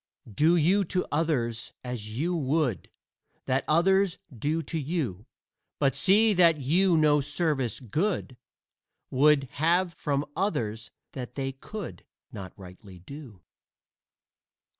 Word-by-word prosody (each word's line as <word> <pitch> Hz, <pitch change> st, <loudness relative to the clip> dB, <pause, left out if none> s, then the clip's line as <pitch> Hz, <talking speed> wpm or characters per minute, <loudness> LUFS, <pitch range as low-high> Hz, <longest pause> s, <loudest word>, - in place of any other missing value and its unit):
Do 155 Hz, -, +4 dB
you 180 Hz, +5 st, +3 dB
to 180 Hz, +2 st, -1 dB
others 130 Hz, -8 st, -1 dB
as 115 Hz, -3 st, -6 dB
you 175 Hz, +6 st, 0 dB
would 140 Hz, -, -1 dB, 0.6 s
That 130 Hz, +1 st, 0 dB
others 190 Hz, +3 st, +3 dB, 0.2 s
do 155 Hz, +7 st, -1 dB
to 160 Hz, +3 st, -4 dB
you; 135 Hz, -, -3 dB, 0.5 s
But 135 Hz, -1 st, +2 dB
see 210 Hz, +3 st, +4 dB
that 170 Hz, -4 st, +4 dB
you 170 Hz, +6 st, +3 dB
no 150 Hz, -1 st, +4 dB
service 145 Hz, -, -1 dB
good 145 Hz, -, -2 dB, 0.8 s
Would 145 Hz, +2 st, +4 dB, 0.2 s
have 175 Hz, +2 st, +2 dB
from 145 Hz, -2 st, -2 dB
others 115 Hz, -, -2 dB, 0.2 s
that 125 Hz, -2 st, -7 dB
they 135 Hz, -1 st, -2 dB
could 135 Hz, -, -8 dB, 0.3 s
Not 95 Hz, -2 st, -8 dB
rightly 95 Hz, 0 st, -13 dB
do. 110 Hz, -, -12 dB
145 Hz, 120 wpm, -27 LUFS, 120-170 Hz, 0.8 s, Do